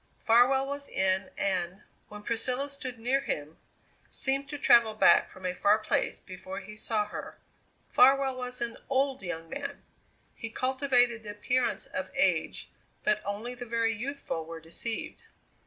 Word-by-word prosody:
Farwell 250 +4 +4
was 280 +1 -6
in 190 0 +1
and, 185 0 -1 0.3
when 210 0 -10
Priscilla 250 +5 -1
stood 265 -3 -5
near 250 +4 +1
him, 150 - -4 0.5
seemed 275 +1 -1
to 290 - -4
travel 235 -5 +5
back - - +5
from 185 0 -12
a 180 - 0
far 205 +3 +4
place 215 - -1
before 185 +1 -8
he 205 +2 -10
saw 215 -1 0
her. - - -7 0.5
Farwell 270 +1 +5
was 250 -1 -4
an 235 -1 -2
old 270 -1 +1
young 165 -3 -5
man; 280 - -6 0.5
he 230 - -6
cultivated 250 -1 +2
the 210 - -9
appearance 245 +5 0
of - - -4
age, - - +1 0.3
but 210 0 +2
only 210 +5 -4
the 245 -1 -8
very 230 0 +1
youthful 245 - -4
were 165 +1 -8
deceived. 170 +8 -5
230 Hz, 155 wpm, -29 LUFS, 200-265 Hz, 0.5 s, travel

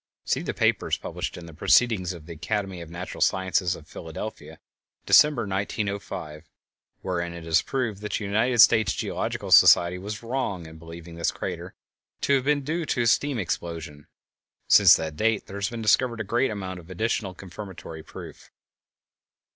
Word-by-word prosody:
(See - - 0
the - - -4
papers - - +1
published - - -5
in 85 - -9
the 85 - -11
Proceedings 95 +2 +3
of 85 -4 -10
the 85 - -8
Academy 95 +2 -3
of 85 - -9
Natural 85 +2 -7
Sciences 95 -1 +1
of 80 - -14
Philadelphia, 80 +8 -8 0.5
December, 150 -1 +5
1905, 100 -6 -4 0.5
wherein 85 -2 -3
it 85 -1 -9
is 80 -1 +3
proved 115 -7 -3
that 105 - -5
the - - -1
United 110 +5 +1
States 110 -3 +5
Geological - - -3
Survey 85 +1 +7
was 105 +4 -6
wrong 115 -8 -3
in 80 0 -12
believing 85 +1 -11
this 85 - +1
crater - - -6 0.5
to 140 - +2
have 135 -2 +2
been 145 -1 +2
due 165 +5 -2
to 120 - 0
a - - -1
steam 140 +4 +2
explosion. 85 -6 -5 0.6
Since - - +8
that 80 -1 -4
date 110 -1 +1
there 100 - -8
has 100 -1 -1
been 115 -1 -6
discovered 115 +2 +2
a - - -1
great 120 +6 +1
amount 95 -4 -5
of 85 +1 -15
additional 100 0 -2
confirmatory 95 -4 -9
proof). - - -11
95 Hz, 170 wpm, -25 LUFS, 85-110 Hz, 0.6 s, Since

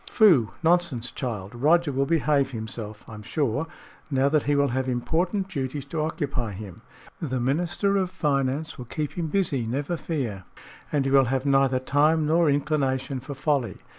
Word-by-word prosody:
"Phoo! 165 - +5
Nonsense, 160 -9 +1
child. 110 -6 -5
Roger 155 +6 +3
will 135 +1 0
behave 150 -4 +2
himself, 110 -2 -4
I - - -10
am 105 - -8
sure, 140 +6 -1 0.4
now 135 -1 +2
that 155 0 +3
he 145 - +3
will 140 0 +3
have 130 +1 -1
important 175 - 0
duties 140 -5 -4
to 160 - 0
occupy 145 - -2
him. 95 -2 -9 0.4
The 130 -5 -2
Minister 175 +10 +1
of 190 -2 0
Finance 145 -5 -1
will 125 - -6
keep 150 +5 -3
him 170 -2 -3
busy, 150 - 0
never 140 +8 -2
fear, 120 - -3 0.5
and 145 -3 +1
he 135 - 0
will 135 -1 +6
have 130 +2 -1
neither 135 -2 +3
time 150 +4 +2
nor 165 +1 +3
inclination 135 -2 0
for 135 +3 -7
folly. 135 - 0
140 Hz, 170 wpm, -25 LUFS, 125-160 Hz, 0.5 s, will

